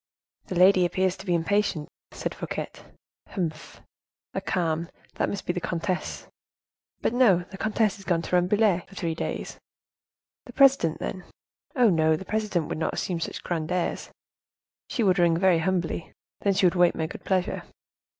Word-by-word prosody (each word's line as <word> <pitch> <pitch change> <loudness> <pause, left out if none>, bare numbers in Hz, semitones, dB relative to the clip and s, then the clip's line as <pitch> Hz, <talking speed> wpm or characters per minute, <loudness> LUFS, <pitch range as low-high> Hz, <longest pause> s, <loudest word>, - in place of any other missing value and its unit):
"The 185 - -4
lady 185 +1 +6
appears 185 +1 +1
to 190 - -11
be 175 - +2
impatient," 170 -2 0 0.2
said - - -4
Fouquet. - - -5 0.6
"Humph! 165 -5 -5 0.5
a - - -2
calm! 165 -2 -1 0.3
That - - +1
must 200 - -4
be 175 - 0
the 180 - -3
comtesse; 180 +2 -3 0.8
but, - - 0
no, 200 -9 +4
the 190 - -8
comtesse 215 -2 +1
is - - -11
gone 170 -3 0
to 180 - -1
Rambouillet 185 0 +2
for 195 - -15
three 170 -3 -2
days. 160 - -4 0.9
The - - -11
presidente, 270 - +4
then? 185 - -5 0.5
Oh! 245 -5 +5
no, 160 -2 +3
the 190 - -7
presidente 210 -7 -1
would - - -4
not 160 - -1
assume 175 -3 -2
such - - -5
grand 165 -1 -2
airs; 180 -1 -1 0.8
she 235 - 0
would 185 -2 +3
ring 170 -1 +4
very 180 -2 +4
humbly, 175 -1 -1 0.3
then 200 -1 +1
she 185 - +3
would 175 - +4
wait 175 -1 +4
my 160 - -1
good 160 - -8
pleasure. 185 -2 0
180 Hz, 170 wpm, -26 LUFS, 170-195 Hz, 0.9 s, lady